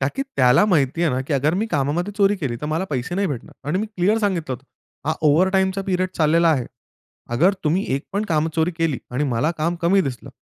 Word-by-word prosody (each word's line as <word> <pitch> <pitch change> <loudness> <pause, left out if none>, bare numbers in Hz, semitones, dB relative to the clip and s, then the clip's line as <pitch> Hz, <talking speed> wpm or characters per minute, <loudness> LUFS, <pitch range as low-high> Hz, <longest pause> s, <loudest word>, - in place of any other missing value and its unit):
ताकी 140 - -1
त्याला 125 +8 +5
माहिती 160 -3 +1
आहे 165 - +3
ना, 130 - -1
की 135 +3 -4
अगर 150 +5 +1
मी 215 +4 0
कामामध्ये 170 +4 -1
चोरी 200 0 +4
केली 130 -9 -3
तर 150 - -4
मला 160 +5 -1
पैसे 140 +5 -2
नाही 200 +2 +1
भेटणार 140 -1 -7
आणि 180 +5 +1
मी 215 - -2
क्लिअर 210 +1 +1
सांगितलं 185 -10 -1
होतं. 130 - -13 0.4
हा 155 - +2
ओव्हरटाईमचा 190 +5 +2
पिरियड 185 -1 0
चाललेला 165 +2 +3
आहे, 130 -6 0 0.7
अगर 175 +11 +3
तुम्ही 170 +6 +1
एक 140 - -2
पण 205 +2 0
काम 160 -4 +1
चोरी 160 +2 +2
केली 165 -5 0
आणि 135 +4 -1
मला 135 +4 0
काम 170 +3 0
कमी 190 +4 +4
दिसलं, 130 - -5
165 Hz, 220 wpm, -21 LUFS, 140-190 Hz, 0.7 s, त्याला